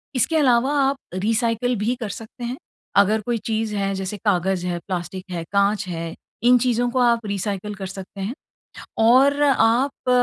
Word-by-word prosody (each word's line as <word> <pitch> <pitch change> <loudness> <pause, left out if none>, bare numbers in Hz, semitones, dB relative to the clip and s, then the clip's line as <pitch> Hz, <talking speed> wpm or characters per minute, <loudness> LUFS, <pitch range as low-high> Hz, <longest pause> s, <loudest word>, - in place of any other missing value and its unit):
इसके 260 +6 +1
अलावा 260 -1 +3
आप 270 0 +1 0.2
रीसायकल 230 +5 0
भी 225 +4 0
कर 215 - -3
सकते 225 +4 -9
हैं। 245 +3 -3 0.4
अगर 210 +2 +4
कोई 240 -1 0
चीज़ 220 -1 -1
है 195 -1 -1
जैसे 190 +2 -4
कागज़ 185 -2 +1
है, 175 - -1
प्लास्टिक 185 0 -4
है, 170 -2 -3
काँच 200 0 +2
है, 165 -1 -4 0.3
इन 250 +1 +6
चीजों 245 0 +1
को 255 - 0
आप 235 -2 +3
रीसायकल 200 0 -3
कर 195 -1 -6
सकते 195 +1 -9
हैं। 210 +6 -3 0.6
और 265 +6 +5
आप 255 0 +2
220 Hz, 170 wpm, -22 LUFS, 195-245 Hz, 0.6 s, इन